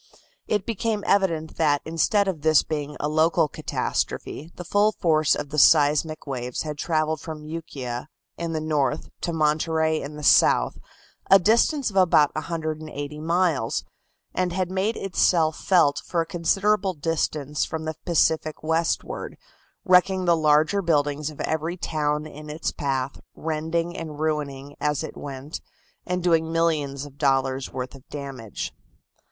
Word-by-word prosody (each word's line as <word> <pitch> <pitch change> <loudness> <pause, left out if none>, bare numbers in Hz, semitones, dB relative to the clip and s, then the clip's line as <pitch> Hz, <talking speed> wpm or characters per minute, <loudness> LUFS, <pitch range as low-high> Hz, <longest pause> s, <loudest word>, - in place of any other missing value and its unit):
It 210 -3 0
became 220 -1 -1
evident 170 -6 +1
that 145 -3 +2
instead 180 +5 +2
of 175 -6 -2
this 155 -1 +5
being 150 -1 -4
a 150 - -1
local 160 +1 +3
catastrophe, 155 +2 -3
the 180 - -7
full 205 +4 +3
force 155 -4 +2
of 145 - -5
the 150 +1 0
seismic 150 +1 +4
waves 125 -3 -3
had 150 -2 -5
travelled 155 -2 0
from 155 -2 -7
Ukiah 140 -6 -5 0.3
in 170 -1 -4
the 160 - -1
north 150 -1 0
to 170 - -1
Monterey 160 0 +1
in 150 +2 -7
the 150 - -8
south, - - +4 0.5
a 195 - +9
distance 230 - +2
of 195 - -5
about 165 -5 +5
180 155 -2 -4
miles, 165 -7 +1 0.5
and 180 -1 0
had 185 0 -1
made 195 +4 0
itself 170 -4 +2
felt 155 -7 +3
for 170 -1 -1
a - - -2
considerable 195 +4 +1
distance 150 -2 -1
from 160 0 -4
the 160 - -2
Pacific 160 -2 +1
westward, 160 +1 -1 0.5
wrecking 185 0 +4
the 170 -1 +5
larger 155 +5 +3
buildings 150 -3 +1
of 150 - -12
every 160 +3 -2
town 150 -2 -1
in 150 0 -10
its 155 +2 -3
path, 135 -2 -2 0.2
rending 165 +2 -2
and 155 -3 -6
ruining 145 -3 -2
as 150 -1 0
it - - -7
went, 140 +2 -7 0.5
and 180 -1 -1
doing 165 -2 +2
millions 150 -4 0
of 140 -1 -14
dollars 135 -2 +1
worth 130 0 -5
of 135 -1 -15
damage. 135 -7 -6
155 Hz, 150 wpm, -24 LUFS, 145-170 Hz, 0.5 s, a